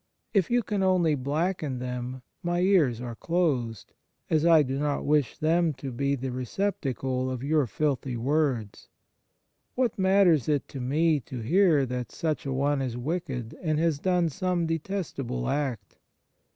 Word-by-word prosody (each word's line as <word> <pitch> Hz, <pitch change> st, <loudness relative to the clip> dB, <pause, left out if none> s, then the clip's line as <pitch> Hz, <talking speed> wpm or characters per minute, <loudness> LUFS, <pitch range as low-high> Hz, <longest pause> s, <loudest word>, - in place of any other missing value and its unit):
If 195 Hz, -5 st, +2 dB
you 240 Hz, 0 st, +2 dB
can 205 Hz, -2 st, -2 dB
only 180 Hz, -4 st, +3 dB
blacken 150 Hz, +1 st, -1 dB
them, 125 Hz, 0 st, -5 dB, 0.2 s
my 175 Hz, 0 st, 0 dB
ears 170 Hz, -, +3 dB
are 120 Hz, -1 st, -5 dB
closed, 130 Hz, -, -1 dB, 0.4 s
as 160 Hz, +1 st, +3 dB
I 160 Hz, -3 st, +7 dB
do 135 Hz, 0 st, -3 dB
not 145 Hz, -1 st, -1 dB
wish 145 Hz, -4 st, +1 dB
them 165 Hz, +1 st, +2 dB
to 135 Hz, 0 st, -7 dB
be 140 Hz, +3 st, 0 dB
the 130 Hz, -1 st, -4 dB
receptacle 130 Hz, -, -2 dB
of 130 Hz, -1 st, -4 dB
your 150 Hz, -2 st, +2 dB
filthy 135 Hz, 0 st, -1 dB
words. 130 Hz, -4 st, -1 dB, 0.9 s
What 250 Hz, -5 st, 0 dB
matters 190 Hz, -, +4 dB
it 145 Hz, -2 st, +1 dB
to 135 Hz, -, -7 dB
me 150 Hz, +5 st, +2 dB
to 125 Hz, 0 st, -7 dB
hear 160 Hz, -, +4 dB
that 125 Hz, -1 st, -4 dB
such 155 Hz, -3 st, -2 dB
a -, -, -2 dB
one 140 Hz, +1 st, +1 dB
is 125 Hz, -3 st, -3 dB
wicked, 130 Hz, -4 st, -3 dB
and 155 Hz, -4 st, 0 dB
has 160 Hz, -2 st, +1 dB
done 180 Hz, -1 st, +2 dB
some 180 Hz, +2 st, -1 dB
detestable 160 Hz, -, -3 dB
act 130 Hz, -9 st, -2 dB
145 Hz, 155 wpm, -27 LUFS, 130-170 Hz, 0.9 s, I